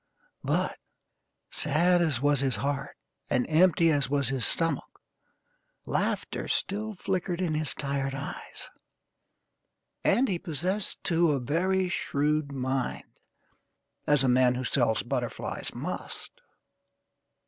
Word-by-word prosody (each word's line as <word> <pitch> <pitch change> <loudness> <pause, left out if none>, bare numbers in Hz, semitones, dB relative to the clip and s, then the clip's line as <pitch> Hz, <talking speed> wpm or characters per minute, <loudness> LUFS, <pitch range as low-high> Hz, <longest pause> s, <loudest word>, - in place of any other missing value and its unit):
But, - - 0 0.7
sad 175 +4 +2
as 155 -8 +1
was 145 0 +3
his 135 -2 +2
heart, 140 0 -3 0.3
and 125 - +2
empty 165 +1 +4
as 140 -3 +1
was 140 -3 +1
his 135 -2 0
stomach, 165 -1 -1 0.9
laughter - - -1
still 215 +2 -2
flickered 180 -1 -2
in 175 -4 0
his 155 -1 +1
tired 140 -1 -2
eyes; 140 +2 -7 1.3
and 265 +2 +3
he 180 -4 -1
possessed, 185 +4 -1
too, 170 -2 +3
a 140 - 0
very 185 +8 +1
shrewd 150 -3 0
mind, 130 -1 -3 0.9
as 145 -2 +4
a - - +3
man 125 0 +4
who 130 - -3
sells 120 -3 +1
butterflies 120 -1 -3
must. - - -5
145 Hz, 115 wpm, -28 LUFS, 135-175 Hz, 1.3 s, empty